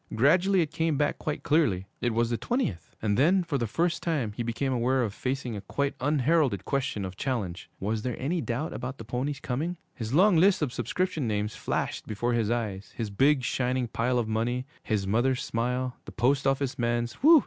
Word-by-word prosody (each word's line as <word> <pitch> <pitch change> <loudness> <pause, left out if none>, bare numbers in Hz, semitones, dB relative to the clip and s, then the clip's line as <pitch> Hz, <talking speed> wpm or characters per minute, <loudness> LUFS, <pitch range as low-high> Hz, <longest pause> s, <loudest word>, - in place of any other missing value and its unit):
Gradually 180 - +4
it 155 -2 -1
came 160 -2 0
back 145 0 0
quite 150 - -3
clearly. 140 - +2 0.2
It 120 - +1
was 115 +1 +1
the - - +2
twentieth. 180 - -2
And 105 +1 +1
then, 180 +7 +4
for 145 -5 -1
the 120 - 0
first 170 +9 0
time, 145 -11 0
he 110 - -5
became 120 +3 -1
aware 125 +1 +2
of 105 -4 -2
facing 125 -1 -3
a 100 - -5
quite 140 +6 -1
unheralded 140 - +2
question 140 -7 -1
of 95 0 -6
challenge. 95 -9 -3
Was 105 +3 -1
there 125 +1 -2
any 160 +6 0
doubt 135 +6 -2
about 130 +1 -5
the 115 - -9
pony's 130 +5 -2
coming? 155 +8 -2 0.2
His 110 -3 -5
long 180 +5 +5
list 185 0 +4
of 130 -5 -2
subscription 180 -8 -1
names 105 0 -1
flashed - - -2
before 120 +3 -1
his 115 -3 +1
eyes, 105 -5 -3
his 110 -3 -3
big, 135 +6 +3
shining 125 0 0
pile 125 +3 0
of 120 -2 0
money, 120 +3 -1 0.2
his 105 -4 -1
mother's 120 +6 +1
smile, 125 +2 -1
the - - -8
post 135 +3 +2
office 135 -1 0
man's 120 0 0
'whew!' 315 +3 +9
125 Hz, 205 wpm, -28 LUFS, 115-150 Hz, 0.2 s, whew